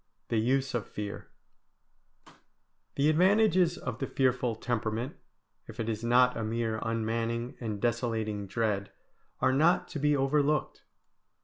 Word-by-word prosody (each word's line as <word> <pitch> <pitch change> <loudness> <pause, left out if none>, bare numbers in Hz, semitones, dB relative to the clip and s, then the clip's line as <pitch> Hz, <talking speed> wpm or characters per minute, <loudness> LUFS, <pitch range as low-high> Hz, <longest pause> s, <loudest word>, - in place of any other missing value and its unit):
V - - +2
THE 110 - 0
USE 135 0 +1
OF 120 -5 -2
FEAR 105 -1 -6 1.7
The 140 +1 +2
advantages 180 +1 +4
of - - -5
the 135 - -2
fearful 125 -3 +1
temperament, 115 +2 -2 0.5
if 115 +2 -11
it 115 - -2
is 110 0 -3
not 125 +1 +4
a 115 - -3
mere 110 0 -1
unmanning 115 +2 -2
and 110 -4 -4
desolating 110 -3 -1
dread, 100 -1 -1 0.5
are 130 - +3
not 160 +6 +3
to 155 - -5
be 150 0 +2
overlooked. 145 +2 +1
120 Hz, 135 wpm, -29 LUFS, 110-135 Hz, 1.7 s, advantages